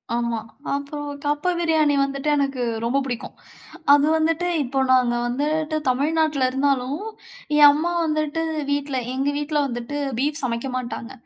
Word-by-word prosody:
ஆமா 235 Hz, -1 st, -1 dB, 0.4 s
அப்புறம் 290 Hz, +1 st, -5 dB, 0.2 s
கப்ப 295 Hz, +5 st, +1 dB
பிரியாணி 315 Hz, -4 st, +2 dB
வந்துட்டு 275 Hz, +1 st, -1 dB
எனக்கு 275 Hz, -2 st, -1 dB, 0.2 s
ரொம்ப 240 Hz, +4 st, +1 dB
புடிக்கும். 245 Hz, -3 st, -5 dB, 0.6 s
அது 290 Hz, 0 st, +5 dB
வந்துட்டு 325 Hz, +2 st, +1 dB, 0.2 s
இப்போ 270 Hz, +1 st, -2 dB
நாங்க 250 Hz, -2 st, +4 dB
வந்துட்டு 305 Hz, +5 st, -1 dB
தமிழ்நாட்ல 295 Hz, +1 st, +1 dB
இருந்தாலும், 270 Hz, +2 st, 0 dB, 0.6 s
என் 295 Hz, -1 st, +9 dB
அம்மா 320 Hz, +4 st, -1 dB
வந்துட்டு 310 Hz, 0 st, -1 dB, 0.3 s
வீட்ல, 285 Hz, -1 st, -1 dB, 0.2 s
எங்க 270 Hz, +2 st, 0 dB
வீட்ல 295 Hz, +1 st, -2 dB
வந்துட்டு, 240 Hz, +3 st, -5 dB, 0.2 s
பீஃப் 295 Hz, +3 st, 0 dB
சமைக்க 235 Hz, +1 st, -2 dB
மாட்டாங்க. 250 Hz, 0 st, -5 dB
285 Hz, 135 wpm, -23 LUFS, 255-305 Hz, 0.6 s, என்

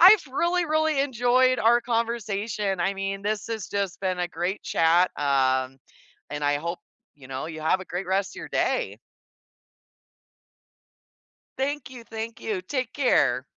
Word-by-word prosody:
I've 380 Hz, +1 st, +9 dB
really, 345 Hz, +6 st, +1 dB
really 310 Hz, -2 st, +2 dB
enjoyed 255 Hz, -1 st, +3 dB
our 235 Hz, +2 st, +5 dB
conversation, 220 Hz, -4 st, -1 dB
I 195 Hz, +3 st, +1 dB
mean 195 Hz, 0 st, -3 dB
this 210 Hz, 0 st, -1 dB
has 220 Hz, -3 st, -4 dB
just 200 Hz, -3 st, -2 dB
been 185 Hz, -2 st, -1 dB
a 175 Hz, -, -1 dB
great 175 Hz, +4 st, -3 dB
chat, 170 Hz, +3 st, +3 dB
um, 130 Hz, -2 st, +1 dB, 0.5 s
and 145 Hz, 0 st, -3 dB
I 145 Hz, 0 st, +3 dB
hope, 170 Hz, +4 st, -4 dB, 0.4 s
you 140 Hz, -3 st, -15 dB
know, 135 Hz, +1 st, -4 dB
you 160 Hz, -1 st, -7 dB
have 160 Hz, +4 st, +2 dB
a -, -, -7 dB
great 180 Hz, +1 st, -4 dB
rest 190 Hz, +1 st, -1 dB
of -, -, -6 dB
your -, -, -7 dB
day. -, -, 0 dB, 2.6 s
Thank 280 Hz, 0 st, -2 dB
you, 250 Hz, -2 st, -10 dB
thank 225 Hz, 0 st, -6 dB
you, 205 Hz, -4 st, -2 dB
take 255 Hz, +4 st, -3 dB
care. 140 Hz, -, +3 dB
200 Hz, 155 wpm, -26 LUFS, 170-245 Hz, 2.6 s, I've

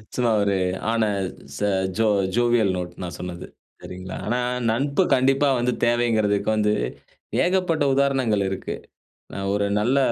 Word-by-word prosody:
சும்மா 120 Hz, -2 st, +2 dB
ஒரு 100 Hz, -1 st, +1 dB, 0.4 s
ஆன 115 Hz, -1 st, +1 dB, 0.5 s
ச -, -, -7 dB, 0.4 s
ஜோ 110 Hz, 0 st, +3 dB, 0.3 s
ஜோவியல் 120 Hz, -5 st, +3 dB
நோட் 90 Hz, -1 st, -5 dB
நான் 90 Hz, -, -6 dB
சொன்னது. 90 Hz, 0 st, -6 dB, 0.3 s
சரிங்களா! 95 Hz, +1 st, -8 dB
ஆனா 120 Hz, +3 st, 0 dB, 0.3 s
நட்பு 140 Hz, +9 st, +1 dB
கண்டிப்பா 135 Hz, +2 st, +3 dB
வந்து 125 Hz, +1 st, +1 dB
தேவைங்கிறதுக்கு 110 Hz, -4 st, +1 dB
வந்து 105 Hz, -1 st, +2 dB, 0.7 s
ஏகப்பட்ட 180 Hz, -4 st, +1 dB
உதாரணங்கள் 135 Hz, -7 st, +2 dB
இருக்கு. 95 Hz, -, -4 dB, 0.6 s
நான் 100 Hz, 0 st, -3 dB
ஒரு 100 Hz, 0 st, +1 dB
நல்ல 125 Hz, +6 st, +2 dB
115 Hz, 130 wpm, -23 LUFS, 100-130 Hz, 0.7 s, ஜோ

